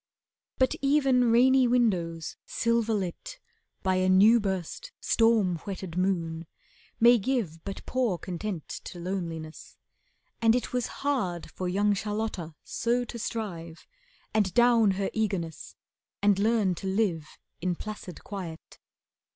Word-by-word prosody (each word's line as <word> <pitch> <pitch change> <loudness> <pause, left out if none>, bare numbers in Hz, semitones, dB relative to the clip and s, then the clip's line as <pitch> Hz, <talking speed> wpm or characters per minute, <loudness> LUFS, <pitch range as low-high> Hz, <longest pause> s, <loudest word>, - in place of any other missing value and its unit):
But 260 -1 +3
even 270 -4 +3
rainy 255 +2 +5
windows, 175 -10 0
silver 230 -1 0
lit 210 - -4 0.5
By 185 -1 +2
a 185 0 +2
new 210 +5 +6
burst, 195 - -4
storm 225 -6 +3
whetted 185 -1 -7
moon, 170 -3 -1 0.5
may 240 +1 +7
give 195 -9 -2
But 195 -1 -7
poor 245 -8 0
content 180 0 -5 0.2
to 180 - -8
loneliness, 170 -3 -5 0.6
and 225 0 +5
it 250 - -2
Was 250 -2 0 0.2
hard 190 - -1
for 185 -1 -3
young 205 +3 +2
Charlotta 205 -5 -3
so 240 +1 0
to 235 - -7
strive 170 -8 -5 0.5
And 205 -4 +2
down 240 -3 +5
her 195 -1 -1
eagerness 190 -8 -3 0.4
and 200 -1 +3
learn 215 -3 +2
to 190 - -6
live 190 -6 -1 0.2
In 180 0 0
placid 205 -3 -8
quiet. 180 -6 -8
200 Hz, 125 wpm, -28 LUFS, 175-230 Hz, 0.6 s, may